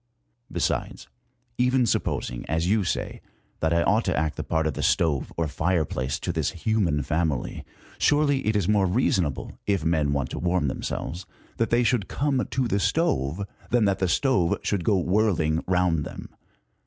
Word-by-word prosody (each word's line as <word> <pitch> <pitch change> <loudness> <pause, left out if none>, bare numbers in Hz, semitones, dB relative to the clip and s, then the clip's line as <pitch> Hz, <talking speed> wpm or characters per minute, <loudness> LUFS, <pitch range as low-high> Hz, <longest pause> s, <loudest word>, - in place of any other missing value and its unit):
Besides, - - -2 0.5
even 125 0 +3
sup 115 - +1
posing, - - -3
as 80 +1 0
you 105 +2 +2
say, 90 - -3 0.4
that 80 - +1
I 85 0 +3
ought 105 +7 +3
to 90 - 0
act 75 0 0
the - - -4
part 80 -1 0
of 80 - -2
stove 75 -5 +1
or 85 -1 0
fireplace 75 -5 -1
to 90 - -2
this 80 -5 0 0.2
human 90 -10 +1
family, 75 -1 -1 0.4
surely 145 -2 +3
it 110 - +2
is 100 -4 +1
more 105 -2 +3
reasonable, 90 - 0
if 100 -6 +1
men 80 -3 +2
want 70 -3 -1
to - - -4
warm 85 -4 +1
themselves, 85 +6 -4 0.3
that 115 - +1
they 120 +1 +3
should 115 -4 +1
come 140 -2 0
to 130 -1 0
the 100 -3 0
stove, 95 - 0 0.2
than 120 -3 +3
that 100 -1 +1
the 95 - +1
stove 95 - +2
should 100 -4 -1
go 100 +3 +3
whirling 90 -4 +1
round 90 -4 +2
them. - - -8
90 Hz, 175 wpm, -25 LUFS, 80-110 Hz, 0.5 s, even